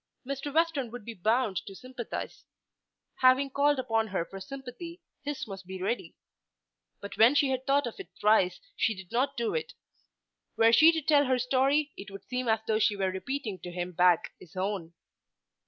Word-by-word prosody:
Mr. 275 +2 -4
Western 315 -5 +1
would 235 -2 -9
be 235 - -6
bound 220 +1 +1
to 195 - -6
sympathise. 255 0 -7 0.7
Having 260 +2 +4
called 285 +1 +3
upon 225 -3 0
her 190 -4 -2
for 195 - -9
sympathy, 270 - -8 0.2
his 290 -4 -4
must 195 -3 -9
be 190 0 -6
ready. 210 +6 -3 0.9
But 200 - -8
when 235 +6 +7
she 285 -2 +3
had 260 0 -3
thought 280 0 +3
of 235 - -6
it 390 - -8
thrice 210 -3 +3 0.2
she 220 - +1
did 190 -2 -12
not 270 +3 0
do 235 -1 -1
it. 475 - -3 0.8
Were 225 0 +5
she 315 +7 +8
to 320 -2 -3
tell 290 -1 +4
her 255 -1 +2
story 270 +4 +2
it 200 - -9
would 195 0 -10
seem 250 0 -3
as 220 -1 +2
though 220 -1 +1
she 210 -1 +3
were 190 -1 0
repeating 215 0 -4
to 180 - -8
him 175 0 -4
back 180 -1 +3
his 180 +1 -16
own. 185 -3 -3
235 Hz, 190 wpm, -29 LUFS, 195-275 Hz, 0.9 s, she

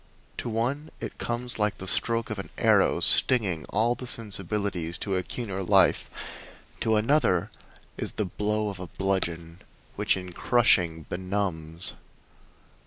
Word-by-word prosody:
To - - -4
one 130 +7 -2
it - - -7
comes 120 0 -3
like 105 -1 +1
the 95 - -7
stroke 115 +3 +2
of 105 - -3
an 95 - -6
arrow, - - +3
stinging 95 - +3
all 115 +8 +1
the 125 +1 -8
sensibilities 100 -6 -1
to 100 -2 -2
a 95 - +1
keener 95 0 -5
life; 90 - +3 0.7
to 110 -1 +1
another 110 - +2 0.5
as - - -2
the 105 - -1
blow 105 +3 -1
of 95 -2 -7
a 90 - -6
bludgeon, 85 -2 -2 0.4
which - - +2
in 90 -1 -7
crushing 90 -9 +3
benumbs. 90 -3 -2
100 Hz, 140 wpm, -27 LUFS, 90-115 Hz, 0.7 s, arrow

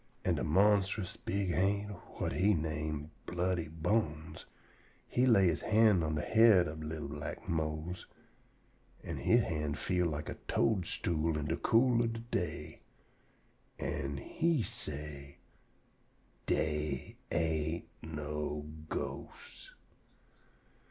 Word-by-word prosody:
An' - - +3
de - - -1
monstrous 100 +2 +3
big 95 -2 -1
ha'nt 100 +2 +1 0.2
whut - - -1
he 100 +2 +3
name 80 -1 -3 0.2
Bloody 90 -1 0
Bones 80 -1 -1 0.6
he 125 +1 +2
lay 100 -6 +6
he - - -6
hand 105 -5 +5
on 80 -1 0
de 75 - -1
head 110 -5 +6
ob 80 +1 -6
li'l 75 -1 -4
black 75 +1 -6
Mose, 80 +2 -2 1.0
and - - -4
he 115 - +4
hand 75 -9 0
feel 90 -1 +1
like 75 -1 -3
a - - -6
toadstool 85 -6 +1
in 75 - -2
de 80 +2 0
cool 120 0 +4
ob 115 -1 0
de 115 - -5
day, 100 -8 -4 1.0
an' 70 +1 -3
he 165 - +1
say: 70 -4 -6 1.1
"Dey 75 -3 -1
ain't 80 0 0
no 75 -1 -4 0.2
ghosts." - - -6
80 Hz, 120 wpm, -33 LUFS, 75-100 Hz, 1.1 s, lay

